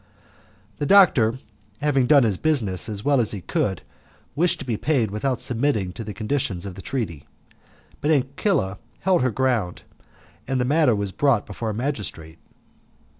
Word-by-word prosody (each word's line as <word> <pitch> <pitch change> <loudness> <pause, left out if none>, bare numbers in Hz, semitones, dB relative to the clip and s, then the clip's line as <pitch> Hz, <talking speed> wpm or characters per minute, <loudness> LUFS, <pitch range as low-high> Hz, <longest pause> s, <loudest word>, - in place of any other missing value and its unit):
The 145 - -2
doctor 140 - +5 0.4
having 140 -4 +2
done 140 -1 +6
his 110 -4 +1
business 115 - 0
as 105 0 -5
well 140 -3 +4
as 110 - 0
he 100 - -5
could 95 +1 -2 0.5
wished 175 +3 +2
to - - -8
be 120 -3 -1
paid 120 -4 0
without 125 +4 -1
submitting 115 -7 -1
to 115 - -7
the 105 - -6
conditions 105 -5 -2
of 100 - -6
the 95 - -10
treaty, 85 - -4 0.7
but 150 - 0
Ancilla 135 - 0 0.2
held 185 -3 +2
her 130 - +2
ground, 120 -7 -1 0.6
and 135 -1 0
the 125 - +1
matter 145 -3 +3
was 100 -1 -2
brought 135 -2 +2
before 110 +2 -5
a 105 - -3
magistrate. 95 - -4
120 Hz, 165 wpm, -23 LUFS, 100-140 Hz, 0.7 s, done